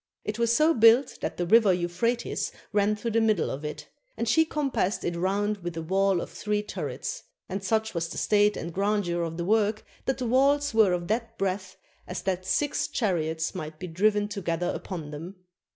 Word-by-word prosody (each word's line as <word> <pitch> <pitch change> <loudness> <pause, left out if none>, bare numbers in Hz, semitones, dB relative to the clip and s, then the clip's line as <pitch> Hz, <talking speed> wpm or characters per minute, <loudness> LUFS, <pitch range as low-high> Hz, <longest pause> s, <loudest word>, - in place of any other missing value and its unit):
It 215 +2 -3
was 235 -1 +2
so 310 +7 +4
built 230 +2 +5
that - - -3
the 175 - -1
river 215 +2 +6
Euphrates 180 +7 -1 0.2
ran 205 +1 +3
through 230 +3 -3
the 230 +1 +2
middle 215 -6 +2
of 140 +3 -5
it; 150 0 -6 0.3
and 230 - -2
she 320 +8 +4
com 300 -3 -2
passed 195 -2 0
it 170 - -1
round 200 +4 0
with 175 -2 -5
a 165 - -3
wall 190 +1 +2
of - - -7
three 210 0 -2
turrets; - - -5 0.3
and 195 +1 -4
such, 220 +2 0
was 170 -1 -2
the - - -7
state 210 0 +3
and 170 +1 -5
grandeur 195 -3 0
of 165 -1 -3
the 170 - -2
work 215 +1 +1 0.2
that 265 -2 0
the 255 - -3
walls 280 +3 +3
were 215 -5 +5
of 175 -1 -2
that 230 +1 -2
breadth 190 -1 -2 0.3
as 180 - -5
that 185 -1 -2
six 290 +8 +1
chariots 165 -7 -1
might 155 0 -6
be 180 - -6
driven 205 +4 +1
together 175 -4 -2
upon 160 -6 -6
them. 165 +6 -7
205 Hz, 200 wpm, -27 LUFS, 175-225 Hz, 0.3 s, river